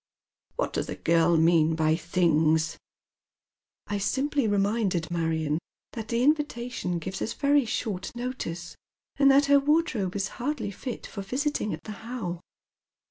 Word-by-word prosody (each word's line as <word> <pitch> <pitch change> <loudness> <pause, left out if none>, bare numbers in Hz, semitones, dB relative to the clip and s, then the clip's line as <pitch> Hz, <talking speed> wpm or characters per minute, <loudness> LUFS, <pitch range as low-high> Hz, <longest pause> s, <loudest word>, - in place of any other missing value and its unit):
" - - -48
What - - -1
does - - -1
the - - -4
girl 165 0 +3
mean 160 -1 +4
by 155 0 +2
things? 160 -2 +2 0.4
" - - -67
" - - -67 0.3
I 205 0 -2
simply 275 +4 0
reminded 200 -4 0
Marion 160 -2 0 0.3
that 225 -2 -5
the 235 +2 0
invitation 250 - 0
gives 190 +3 -5
us 225 - -2
very 285 -2 +3
short 215 -4 -3
notice, 235 -9 -5 0.4
and 275 -1 +6
that 275 +1 +6
her 280 0 +6
wardrobe 275 - +1
is 195 -1 0
hardly 265 -5 -2
fit 240 +5 -6
for 200 - -6
visiting 260 +1 -1
at - - -6
the 215 - -7
How." 220 -8 -5
205 Hz, 155 wpm, -27 LUFS, 170-255 Hz, 0.4 s, and